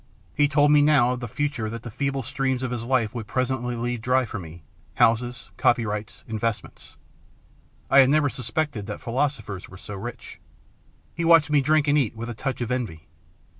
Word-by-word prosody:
He 145 - +3
told 145 0 +3
me 150 -1 +6
now 145 -5 +4
of 125 - -5
the 120 - -5
future 140 -3 -2
that 115 0 -7
the 120 - -7
feeble 135 +3 -2
streams 130 0 -1
of 125 - -2
his 120 -2 -3
life 120 -4 +1
would 115 -3 -6
presently 125 0 -1
leave 120 0 -3
dry 125 +2 +2
for 110 - -6
me, 80 -1 -11 0.3
houses, 120 +2 +1
copyrights, 105 -2 0
investments; 110 -1 -4 0.9
I 135 - +6
had 135 -1 +7
never 150 0 +3
suspected 125 -3 -3
that 105 - -5
philosophers 120 -6 -2
were 90 - -12
so 105 - -9
rich. 115 +5 -8 0.7
He 170 - -3
watched 165 -3 +5
me 145 -2 +4
drink 155 +1 +2
and 145 +1 +4
eat 115 -5 -1
with 115 +2 -5
a - - -5
touch 130 +4 -4
of 120 0 -2
envy. 110 -11 -4
125 Hz, 190 wpm, -24 LUFS, 115-140 Hz, 0.9 s, had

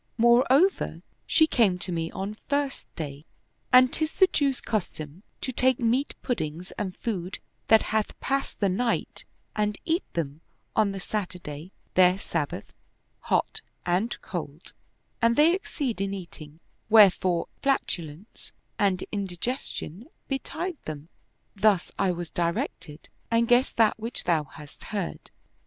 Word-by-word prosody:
More 235 +2 +5
over, 355 +9 +3 0.2
she 315 - +6
came 220 -11 +3
to 180 - -3
me 165 -1 -1
on 195 +4 -4
First 285 -1 -1
Day; 145 -2 -6 0.5
and 255 +2 +7
'tis 315 -1 -1
the 380 - +6
Jew's 285 -7 +1
cus 215 -5 -1
tom 155 +3 -9 0.2
to 260 - -2
take 255 0 +3
meat 245 +4 +1
puddings 175 - -3
and 185 -3 -4
food 190 -5 -3 0.3
that 220 -1 +6
hath 215 -1 0
passed 275 0 -2
the 200 - +4
night 230 +6 -1 0.3
and 210 -1 0
eat 335 +2 +1
them 155 -2 -3 0.3
on 215 -2 +3
the 195 - -5
Saturday 180 -5 -5 0.2
their 180 0 +5
Sabbath, 165 -6 -3 0.5
hot - - 0 0.2
and 185 +7 0
cold, 165 -3 -6 0.5
and 230 0 +4
they 310 +5 +6
exceed 285 - -2
in 195 0 -1
eating; 165 -4 -10 0.3
wherefore 190 -5 +5
flatulence 180 - -2 0.3
and 195 -3 +2
indigestion 200 - -4 0.2
betide 315 +5 -3
them. 155 +1 -7 0.5
Thus 200 -3 +3
I 190 - +3
was 175 -1 -5
directed 170 -3 -3 0.2
and 230 0 +3
guessed 245 +2 +3
that 225 -1 +4
which 230 +2 -3
thou 160 -4 +2
hast 150 0 -13
heard." 200 -5 -4
200 Hz, 140 wpm, -27 LUFS, 170-245 Hz, 0.5 s, and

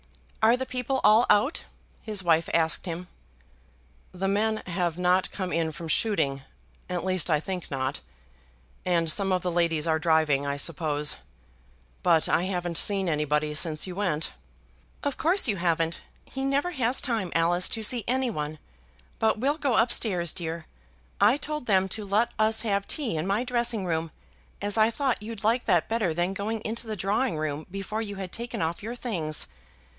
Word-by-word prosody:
"Are 225 +3 +5
the 260 - -3
people 255 +1 -2
all 215 +3 +6
out?" 210 +9 +3 0.4
his 210 -3 0
wife 165 -1 +3
asked 165 +2 +1
him. 175 +1 -4 1.0
"The 190 +1 -2
men 215 +2 +1
have 175 -2 -1
not 180 +1 +2
come 185 -2 -4
in 165 -1 0
from 165 +2 -7
shooting; 150 -8 +1 0.5
at 180 0 -2
least 185 -2 +2
I 155 -2 +3
think 180 +2 -5
not; 130 -1 -2 0.8
and 170 -3 +1
some 195 +3 +1
of 185 -1 +1
the 180 - 0
ladies 170 -2 +1
are 160 -1 +1
driving, 155 -3 +2
I 140 0 -1
suppose. 150 -1 0 0.8
But 165 -3 +4
I 175 - +2
haven't 175 -3 -2
seen 195 -2 +2
anybody 150 -1 0
since 155 0 0
you 185 - -6
went." 175 -5 -1 0.7
"Of 285 -2 -1
course 355 +2 +3
you 205 -4 0
haven't. 165 -1 0 0.2
He 270 - -5
never 280 +6 +1
has 255 -5 +1
time, 225 -8 -1
Alice, 175 +2 +2
to 220 - -2
see 235 +1 +2
any 255 0 +1
one. 150 -4 -4 0.6
But 220 0 +2
we'll 280 +7 0
go 275 -6 +1
up 235 +2 +4
stairs, 180 -9 +2
dear. 165 -1 -4 0.6
I 215 +7 +6
told 300 -3 -5
them 190 -2 +3
to 215 +3 -2
let 205 +4 +1
us 220 +1 +3
have 200 -3 0
tea 275 - -2
in 155 +3 -2
my 205 +5 +1
dressing 235 -4 -1
room, 165 -1 -1 0.5
as 205 0 -1
I 215 +1 +5
thought 255 0 -1
you'd 220 0 -7
like 230 +3 +2
that 175 -2 +3
better 225 -6 0
than 175 +3 0
going 215 +2 -3
into 225 +1 -2
the 215 - -3
drawing 200 +2 0
room 155 0 -3
before 195 +3 -4
you 205 -2 -5
had 190 -2 -6
taken 235 -7 -4
off 165 +1 -2
your 225 +4 -5
things. 170 -12 -1
190 Hz, 180 wpm, -27 LUFS, 165-225 Hz, 1.0 s, all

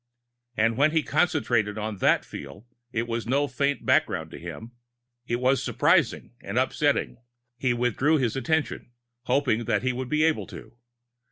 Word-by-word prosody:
And 115 +1 +2
when 155 +3 +3
he 160 -2 +2
concentrated 120 -10 +1
on 105 -1 -4
that - - +2
feel, 70 - -10 0.3
it 115 -1 -1
was 115 -1 -3
no 140 +4 +2
faint 140 -2 -1
background - - +1
to - - -9
him. 115 +2 -8 0.6
It 120 - 0
was 130 +2 +2
surprising - - +2
and - - -5
upsetting. 60 - +1 0.4
He 125 -2 +1
withdrew 125 +6 +2
his 125 -4 0
attention 135 -2 -2 0.3
hoping 125 -5 +1
that 105 -1 0
he 130 0 +1
would 125 0 -5
be 150 0 +2
able 160 -1 +1
to. - - -11
125 Hz, 160 wpm, -26 LUFS, 115-145 Hz, 0.6 s, when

